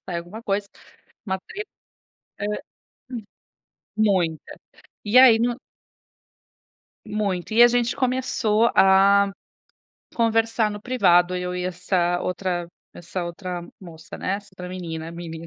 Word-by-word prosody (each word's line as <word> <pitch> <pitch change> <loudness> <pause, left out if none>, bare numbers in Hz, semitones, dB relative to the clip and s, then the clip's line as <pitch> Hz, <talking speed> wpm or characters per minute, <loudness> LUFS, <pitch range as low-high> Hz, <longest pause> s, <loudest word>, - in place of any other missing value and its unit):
alguma 175 +5 -6
coisa, 200 -1 -2 0.6
uma 190 -1 -1
treta. 420 +1 -7 0.7
Hã, 205 - -1
hum. 210 - -2 1.4
Muita. 185 -7 0 0.5
E 210 +3 0
aí 250 -3 +8
no 240 +1 0 1.5
Muito. 210 -2 -2
E 235 - +7
a 240 - +9
gente 240 0 0
começou 250 -3 +1
a 195 +1 +5 0.8
conversar 225 -1 +1
no 205 0 -7
privado 180 -7 +3
eu 180 0 -3
e 180 0 -3
essa 180 -1 0
outra 180 -1 -2 0.3
essa 175 +1 -5
outra 175 +1 -5 0.2
moça, 165 -4 -11
né, 185 - -2
essa 200 0 -13
outra 180 -1 -8
menina, 165 -3 -6
menina. 165 -1 -8
195 Hz, 120 wpm, -23 LUFS, 175-220 Hz, 1.5 s, a